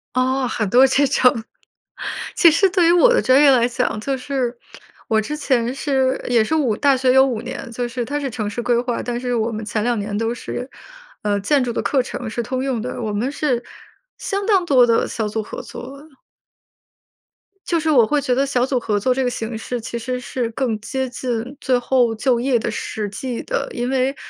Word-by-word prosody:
哦， 255 0 +1
很 215 -4 -2
多 255 +6 +6
这 275 +2 +3
种。 250 -4 +3 0.9
其 335 - +7
实 380 +5 +3
对 355 -2 +3
于 - - +6
我 355 +9 +6
的 - - +4
专 260 +2 +4
业 290 - +7
来 240 -2 +4
讲， 245 -3 -1
就 270 +4 -2
是 255 -2 -2 0.5
我 220 - +2
之 295 +8 -3
前 250 -4 0
是 265 -2 0
也 235 -2 +4
是 220 - -3
5， 255 -9 +1
大 280 -2 +3
学 255 0 +2
有 265 +1 +6
5 240 -5 -2
年， 250 +1 -7
就 245 +1 -3
是 240 0 -4
它 290 +4 -2
是 280 -2 -3
城 220 -3 -4
市 240 +3 -4
规 235 0 +2
划， 245 -1 -2
但 240 -1 -3
是 245 0 -2
我 225 +1 0
们 220 0 -5
前 215 0 -2
2 240 -1 +1
年 205 0 -4
都 225 +2 -1
是， 250 +2 -6 0.5
呃， 205 -1 +1
建 270 +7 +2
筑 240 -2 -2
的 - - -1
课 270 -3 +1
程 245 -2 -6
是 235 +2 -3
通 255 +3 -3
用 265 -4 -1
的， 245 +2 -5
我 215 -2 -2
们 230 +6 -1
是 260 -5 -1 0.6
相 400 0 -2
当 395 -4 +3
多 260 -6 +5
的 230 -1 +2
小 220 -2 -3
组 220 +1 -2
合 210 - -7
作。 275 +4 -10 1.6
就 335 - +1
是 320 0 -1
我 255 -7 +5
会 290 +6 +1
觉 255 -3 0
得 275 - +2
小 255 -3 0
组 255 0 0
合 210 -3 -1
作 255 +5 +2
这 265 +1 -1
个 250 - +1
形 225 -1 -4
式 240 +2 -4
其 235 +1 -5
实 250 +2 -3
是 245 -1 -3
更 230 -3 -2
接 265 +3 -3
近 245 +1 -4
最 255 -1 +1
后 245 -2 +2
就 240 +2 +1
业 245 -1 +1
的 - - -3
实 210 -2 -4
际 245 +3 -5
的， - - -2
因 245 +1 -2
为 265 +1 +1
250 Hz, 230 characters per minute, -20 LUFS, 230-270 Hz, 1.6 s, 其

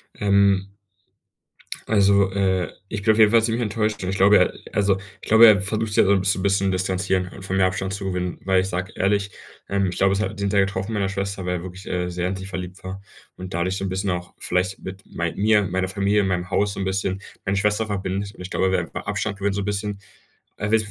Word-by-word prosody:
Ähm 100 -1 +2 1.2
also, 100 -2 +4
äh, 95 -2 0 0.2
ich 105 -2 -4
bin 110 - +4
auf 110 - -1
jeden 105 -1 +7
fall 115 -1 +5
ziemlich 115 +1 0
enttäuscht. 105 -1 -1
Ich 95 +2 -2
glaube, 100 +2 +6
er - - +3 0.2
also, 100 -1 +2 0.2
ich - - -10
glaube, 110 +2 +8
er 100 -3 +6
versucht 110 +2 -1
sich - - +5
halt - - +1
so - - +5
'n 95 - +3
bisschen 95 0 0
bisschen 100 -1 +2
distanzieren 95 0 0
und 95 - -10
von 95 - -1
mir 95 - +4
Abstand 95 +1 -1
zu 100 -1 -6
gewinnen, 90 -2 -3
weil 95 -1 +3
ich 95 - -2
sage 90 0 -3
ehrlich, 100 +1 +1 0.4
ähm, 100 -1 +1
ich 90 - -3
glaube, 95 0 +3
es 100 - 0
hat 100 0 -3
den 100 -1 -1
Teil 100 -2 +3
getroffen 100 +2 -4
meiner 100 -2 0
Schwester, 100 -1 -3
weil 90 0 0
er - - -9
wirklich, 95 +1 -9
äh, 90 0 -2
sehr 90 +1 -2
in 95 - -3
sie 95 - -7
verliebt 95 -1 -7
war 95 +1 -6 0.4
und 90 -1 -8
dadurch 95 +2 -1
so 95 - -3
'n - - -2
bisschen 95 +1 -1
auch 90 0 -4
vielleicht 90 +2 -1
mit 95 +1 -8
mei 85 -1 -3
mir, 105 0 +3
meiner 95 0 -1
Familie, 100 +1 +1
meinem 95 0 -2
Haus 100 +1 +1
so - - -8
'n - - -1
bisschen, 95 0 -2 0.2
meine 100 +1 +1
Schwester 105 +2 +1
verbindet. 100 0 -3
Und - - -10
ich 90 - -8
glaube, 95 - +1
er 95 - +1
will - - +2
einfach - - -6
Abstand 100 - -2
gewinnen 100 0 0
so 100 - -1
'n - - -4
bisschen. 105 0 -3 0.6
Also, 105 +2 +1
i - - +3
95 Hz, 250 wpm, -23 LUFS, 95-100 Hz, 1.2 s, glaube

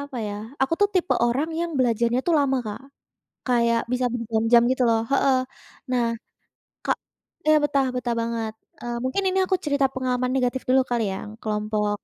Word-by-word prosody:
apa 285 -2 -7
ya, 205 - -4 0.3
aku 270 - +1
tuh, 410 - +5
tipe 365 -1 +2
orang 265 +7 0
yang 340 0 -1
belajarnya 235 0 +2
tuh 340 - +3
lama 275 -2 +2
Kak. 210 -1 -5 0.7
Kayak 235 -1 +3
bisa 250 0 +1
berjam-jam 230 0 +3
gitu 260 -1 +1
loh. 225 -1 +3
Heeh, 275 -1 +4 0.6
nah, 245 -2 +2 0.8
Kak - - +1 0.5
iya, 310 - +6
betah 280 -2 +2
betah 245 -1 -1
banget. 230 -1 -2 0.3
E - - -8 0.2
mungkin 260 +10 -1
ini 380 - +1
aku 375 - +2
cerita 285 -2 +2
pengalaman 255 -1 -1
negatif 255 0 0
dulu 265 +1 +5
kali 240 -2 +1
yang 200 - -6
kelompok 210 -1 -1
250 Hz, 170 wpm, -24 LUFS, 230-270 Hz, 0.8 s, iya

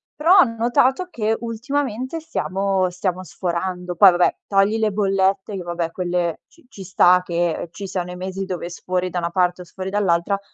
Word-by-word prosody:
Però 340 +6 +5
ho - - +9
notato 245 +7 +1
che 220 -4 0
ultimamente 255 +4 -3
stiamo 195 - -1
stiamo 180 +1 -3
sforando. 180 +1 -4
Poi 195 +1 +8
vabbè, 175 0 +2
togli 200 +2 +2
le 220 -1 +2
bollette 195 0 0
che 190 - -4
vabbè 170 -1 -3
quelle 175 -2 -2
ci 335 -5 -24
ci 195 -6 -11
sta 180 -1 +4
che 170 -1 -2
ci 200 - -7
siano 180 -2 -4
i 180 - -7
mesi 190 +1 -5
dove 180 -2 -5
sfori 180 +1 -2
da 175 - -2
una 170 0 -2
parte 180 0 0
o 180 - -10
sfori 185 +2 -6
dall'altra. 195 -1 +1
190 Hz, 180 wpm, -21 LUFS, 180-215 Hz, -, ho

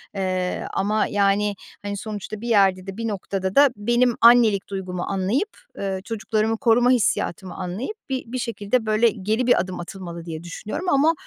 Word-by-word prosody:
eee, 185 -1 -1
ama, 210 +2 +1
yani, 205 0 +1 0.3
hani, 205 0 -4
sonuçta 215 0 -6
bir 240 - -5
yerde 195 -4 +3
de 195 +2 -6
bir 230 - -2
noktada 195 -2 -3
da 285 0 +7
benim 240 +3 +2
annelik 230 -4 +6
duygumu 185 -2 -4
anlayıp, 200 - 0 0.3
ııı, 190 -1 -3
çocuklarımı 220 +1 -1
koruma 245 0 +4
hissiyatımı 190 -6 0
anlayıp 190 - -4
bir 260 -1 -2
bir 255 - -2
şekilde, 230 -1 -1
böyle, 215 +2 +3
geri 220 +4 -1
bir 245 - +5
adım 185 0 -3
atılmalı, 170 -1 -7
diye 160 -1 -6
düşünüyorum 210 - -6
ama 305 +2 +4
205 Hz, 165 wpm, -23 LUFS, 190-235 Hz, 0.3 s, da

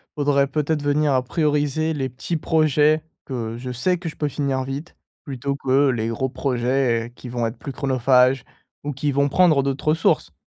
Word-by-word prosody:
faudrait 140 -2 +2
peut-être 150 +1 -1
venir 145 +1 +1
à 130 - +3
prioriser 150 +2 0
les 135 -3 -2
petits 130 +7 -4
projets 155 -1 +2 0.2
que 115 -4 -4
je 125 +1 -6
sais 180 +9 +1
que 175 0 -7
je 155 - -6
peux 150 - -1
finir 135 -2 -1
vite, 135 +5 -6 0.3
plutôt 140 -1 -3
que 135 +1 +2
les 115 -3 -1
gros 130 +3 -2
projets 125 -2 0
qui - - -10
vont 120 -1 -2
être 115 - -7
plus 140 - -7
chronophages 130 -1 +2 0.4
ou 145 - -2
qui 145 +2 -1
vont 140 +1 +2
prendre 155 -1 +4
d'autres 140 +2 -1
ressources. 160 +2 +1
140 Hz, 185 wpm, -22 LUFS, 130-150 Hz, 0.4 s, prendre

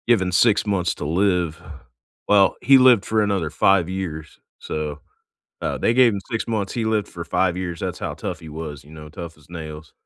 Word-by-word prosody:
Given 95 -7 +3
6 105 +3 +3
months 95 -4 0
to - - -6
live. 90 -1 0 0.7
Well, 100 -2 +4
he 135 +1 +7
lived 125 -6 +6
for 110 0 +1
another 100 -6 0
5 90 +1 +3
years, 80 -5 -6 0.2
so, 75 -1 -5 0.6
uh, - - -2
they - - +2
gave 125 -2 +5
him 100 - -3
6 115 -2 -2
months, 105 -4 -2
he 115 - -2
lived 110 -2 0
for - - -7
5 90 -2 0
years, 90 -3 -4
that's - - -4
how - - -4
tough - - -5
he 80 - -11
was, 75 -3 -7
you 75 - -16
know? 75 -1 -10
Tough 85 +2 -9
as 75 - -21
nails. 75 -3 -8
90 Hz, 205 wpm, -22 LUFS, 80-105 Hz, 0.7 s, he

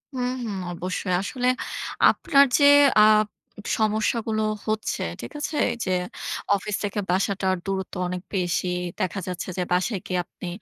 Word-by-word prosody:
হুম, 250 -1 -1
হুম। 205 -4 -4 0.2
অবশ্যই। 185 +1 -3
আসলে 250 +4 -2 0.6
আপনার 280 -3 +4
যে 285 - +5 0.3
আপ 215 0 +6 0.5
সমস্যাগুলো 220 0 +1 0.2
হচ্ছে, 215 0 -1 0.2
ঠিক - - -7
আছে? 295 0 -3 0.3
যে 185 - -1 0.6
অফিস 210 +1 -3
থেকে 205 0 -2
বাসাটার 190 0 +1
দূরত্ব 195 -1 -3
অনেক 180 0 -4
বেশি। 180 0 0 0.3
দেখা 185 +2 -1
যাচ্ছে 185 +1 -4
যে 180 - +1
বাসায় 190 +2 0
গিয়ে 180 -1 -1
আপনি 180 - -10
200 Hz, 135 wpm, -24 LUFS, 185-220 Hz, 0.6 s, আপ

